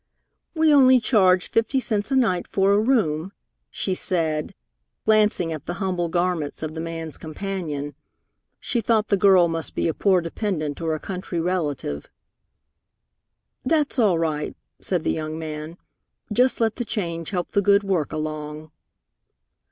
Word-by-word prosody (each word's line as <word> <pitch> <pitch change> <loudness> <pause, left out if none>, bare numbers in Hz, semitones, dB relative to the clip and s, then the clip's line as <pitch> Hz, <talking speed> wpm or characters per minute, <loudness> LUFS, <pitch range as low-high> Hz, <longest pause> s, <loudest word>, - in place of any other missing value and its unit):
"We 320 0 +3 0.3
charge 190 -6 +4
only - - -32
fifty 230 +4 +2
cents 215 -3 -1
a 270 - +1
night 200 -9 +2
for 195 0 +2
a 205 - +4
room," 195 - +1 0.4
she 190 - -2
said, 165 -2 -1 0.5
glancing 210 -6 +3
at 155 - -8
the 175 - -3
humble 180 -3 -1
garments 175 -4 -1
of 155 0 -4
the 160 - -6
man's 165 -2 -6
companion. 155 -4 -4 0.7
She 235 - -1
thought 220 -1 +1
the 200 - +4
girl 190 -3 +5
must 165 -1 -3
be - - 0
a 165 - 0
poor 190 +1 +3
dependent 165 -4 -3
or 160 -1 0
a - - -5
country 180 -1 -4
relative. 155 - -2 1.6
"That's 295 0 +1
all 200 -7 +4
right," 155 -2 -2 0.2
said 180 -4 -1
the - - +1
young 155 0 -4
man. 155 +1 -6 0.6
"Just 250 +4 +3
let 225 -2 +1
the 245 - -1
change 170 -7 -3
help 180 -3 -3
the 200 - +2
good 200 +1 +4
work 185 -7 -1
along." 155 0 -5
180 Hz, 150 wpm, -23 LUFS, 155-205 Hz, 1.6 s, girl